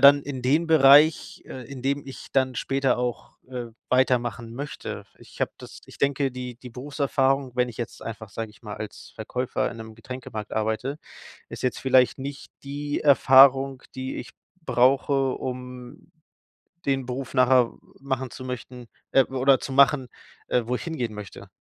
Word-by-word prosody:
dann 140 0 +8
in 140 -2 -5
den 150 +6 +2
Bereich, 150 +1 +6
äh, 130 - -8
in 135 -3 -8
dem 140 +1 -1
ich 135 - -9
dann 130 -1 +2
später 135 +2 +1
auch, 125 -1 -4
äh, 125 -2 -4 0.2
weitermachen 120 -2 +1
möchte. 140 +3 -6
Ich - - -16
habe - - +1
das - - -11
ich - - -15
denke, 140 -1 +1
die 125 -1 -6
die 125 0 -11
Berufserfahrung, 135 +1 0
wenn 125 0 +2
ich 115 - -10
jetzt 120 - -5
einfach, 110 -2 -7
sage 110 +1 -5
ich 105 - -22
mal, 105 -2 -7
als 110 - -8
Verkäufer 125 +3 -2
in 115 - -11
'nem 110 0 -9
Getränkemarkt 115 -3 -7
arbeite, 110 +7 -1 0.5
ist - - -8
jetzt 125 - 0
vielleicht 130 0 +4
nicht 140 +1 -7
die 145 +1 -3
Erfahrung, 135 -1 +6
die 130 0 -4
ich - - -7 0.3
brauche, 135 0 +3
um 125 -1 -8 0.7
den 135 -1 +1
Beruf 130 +2 -5
nachher 125 -2 +4 0.3
machen 130 -2 -3
zu - - -9
möchten 125 -1 -7 0.2
äh, 135 -1 +6
oder 135 0 +3
zu - - -6
machen, 135 -1 +4 0.4
äh, 125 - +2
wo 125 - 0
ich - - -7
hingehen 125 -10 -3
möchte. 105 -2 -9
130 Hz, 165 wpm, -25 LUFS, 125-135 Hz, 0.7 s, dann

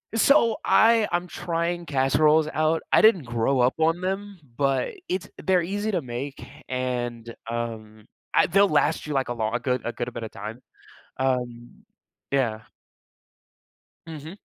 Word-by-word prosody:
So, 230 -2 +4
I, 225 -1 +4
I'm 175 +1 -1
trying 170 0 -3
casseroles 150 +3 +3
out. 155 +1 +1
I - - +6
didn't 205 -8 +5
grow 120 +2 0
up 125 +1 +3
on 165 +2 +2
them, 195 +1 -3 0.2
but 140 - 0 0.2
it's 185 0 -2 0.2
they're 185 -2 +3
easy 205 +4 -2
to 180 -4 0
make, 130 +3 -6 0.2
and 120 -2 -3 0.2
um 110 -2 -5 0.3
I - - +5
they'll 195 +3 +4
last 150 0 +1
you 150 - -3
like 135 -2 0
a - - -1
lon 110 0 -2
a - - 0
good, 125 0 -1
a 120 - -1
good 120 0 -5
bit 120 - -6
of 110 - -5
time, 110 +5 -8 0.6
um, 125 -2 -3 0.5
yeah. 120 -6 0 1.5
Mhm. 160 +3 -8
140 Hz, 155 wpm, -25 LUFS, 120-175 Hz, 1.5 s, I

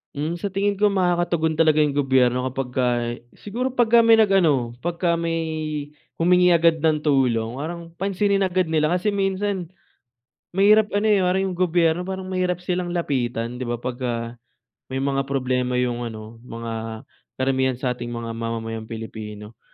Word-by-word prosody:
Hmm, 155 +4 -2
sa 195 +3 -4
tingin 200 +1 0
ko 205 +1 +3
makakatugon 175 -4 +1
talaga 155 -1 +4
yung 150 -2 +2
gobyerno 130 -3 +2
kapagka 125 -2 -1 0.2
siguro 245 +6 -3
pagka 235 -2 +4
may 225 -1 +6
nag-ano, 160 - +3
pagka 170 0 0
may 165 0 -1 0.8
humingi 180 +1 +4
agad 165 -2 +3
ng 155 -2 +3
tulong 125 -6 +1
parang 165 +5 -5
pansinin 195 +1 +1
agad 185 -1 +1
nila 155 -1 +1
kasi 180 +3 0
minsan 195 -3 -1 0.9
mahirap 210 +2 +5
ano, 205 - +1
eh, 200 - +4
parang 185 +1 +1
yung - - -7
gobyerno, 175 0 +2
parang 190 0 -4
mahirap 180 -1 -2
silang 180 0 -1
lapitan, 125 -6 -2
'di 125 - -4
ba, 120 - -1
pagka 120 -1 -4 0.5
may 135 +1 -3
mga 135 0 0
problema 125 -2 -1
yung 120 -1 -1
ano, 110 0 -9
mga 115 -2 -6 0.3
karamihan 130 0 +1
sa 125 0 -2
ating 120 -1 -6
mga 115 -1 -5
mamamayang 115 -1 -4
Pilipino. 110 -1 -8
155 Hz, 150 wpm, -23 LUFS, 120-180 Hz, 0.9 s, may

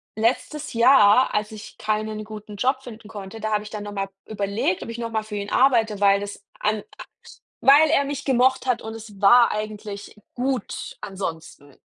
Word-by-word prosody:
letztes 255 +7 -1
Jahr, 240 -1 +5
als 210 0 -1
ich 215 -1 -11
keinen 215 0 -2
guten 215 0 -9
Job 260 +5 0
finden 225 -3 -11
konnte, 205 +1 -9
da 215 +1 -2
habe 210 0 +1
ich 210 - -9
dann 210 -1 -6
nochmal 205 -1 -4 0.2
überlegt, 200 -2 -1
ob - - -9
ich 230 - -6
nochmal 230 -2 -2
für 215 -1 -8
ihn 200 0 -4
arbeite, 230 -6 +3
weil 200 0 +4
das 205 0 -7 0.2
an 210 0 0
aus - - -15 0.2
weil 295 +3 +7
er 280 -3 +3
mich 285 0 -5
gemocht 260 0 +2
hat 250 -2 0
und 220 0 -7
es 215 -3 -11
war 235 +4 +6
eigentlich 210 -1 -6 0.2
gut 255 -2 -3
ansonsten. 165 -7 -7
215 Hz, 180 wpm, -23 LUFS, 205-245 Hz, 0.2 s, weil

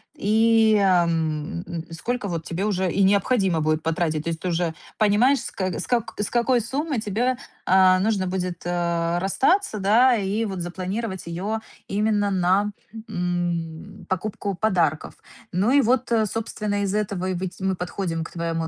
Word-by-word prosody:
и, 220 +1 +4
ам, 165 -3 +1
м, 165 -2 -5
сколько 235 +6 -3
вот 170 -3 -3
тебе 175 +4 -2
уже 190 -4 0
и 200 - +2
необходимо 195 -3 +2
будет 155 0 0
потратить. 160 -1 0
То 170 - -2
есть, 165 - -3
ты 185 - -4
уже 170 -1 0 0.2
понимаешь 225 +6 +4
с - - -6
кэ 185 -3 -2
с - - -4
как 240 -3 -1
с 205 - -2
какой 240 +1 +3
суммой 275 +2 -2
тебе, 235 +5 0 0.3
а, 185 0 +5
нужно 200 -1 +1
будет, 180 -2 -3
э, 170 -1 0
расстаться, 240 - +1
да. 230 +6 +4
И 210 +1 -1
вот 190 -4 -4
запланировать 190 +3 -4
её 195 +6 -3 0.3
именно 205 0 +1
на, 190 +3 +2 0.4
м, 175 -2 -3
покупку 200 +1 -2
подарков. 175 -7 0 0.4
Ну 190 +6 +1
и 280 +2 +5
вот, 255 +1 +1
э, 220 -2 +3
собственно, 210 -1 -3
из 200 0 -1
этого 200 -3 -1
и 185 - -1
выть 185 +1 -5
мы 190 0 0
подходим 175 -2 -3
к - - -9
твоему, 165 -1 -2
190 Hz, 165 wpm, -24 LUFS, 175-215 Hz, 0.4 s, а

